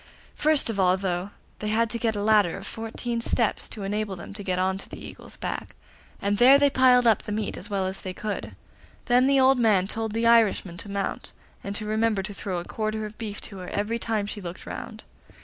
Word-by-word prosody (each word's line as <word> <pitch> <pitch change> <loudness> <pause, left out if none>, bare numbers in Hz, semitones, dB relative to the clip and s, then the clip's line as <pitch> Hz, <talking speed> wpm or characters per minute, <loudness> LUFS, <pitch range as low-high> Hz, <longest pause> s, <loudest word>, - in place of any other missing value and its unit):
First 305 -6 +2
of 200 - -5
all, 185 0 +4
though, 185 0 -2 0.3
they 210 - -4
had 225 +2 +2
to 235 - -2
get 225 -2 0
a 205 - -2
ladder 210 -5 +3
of 195 - -9
fourteen 230 +2 -4
steps, 230 -1 0
to 210 - -5
enable 205 0 -2
them 175 - -9
to 205 - -5
get 185 -2 -1
on 190 +1 0
to - - -10
the - - -8
Eagle's - - -11
back, - - -5 0.4
and 200 0 0
there 260 +3 +8
they 285 0 +3
piled 250 -2 +5
up 225 -2 +5
the - - -7
meat 210 0 -2
as 205 - -6
well 195 -2 0
as 190 +1 -4
they 185 - -5
could. 210 +2 -5 0.5
Then 250 +1 +4
the 275 0 +4
old 265 0 +5
man 210 -6 +4
told 220 +1 -2
the 230 +1 0
Irishman 220 -6 +3
to 205 - -7
mount, 200 0 -3 0.3
and 200 0 -4
to 215 - -1
remember 215 -2 +1
to 205 +1 -5
throw 195 -2 -4
a 175 - -4
quarter 215 0 -3
of 215 0 -10
beef 210 -3 -5
to 195 -3 -7
her 180 - -7
every 215 +3 -1
time 220 -3 -1
she 205 0 -6
looked 175 -1 -8
round. - - -7
210 Hz, 235 wpm, -26 LUFS, 195-230 Hz, 0.5 s, there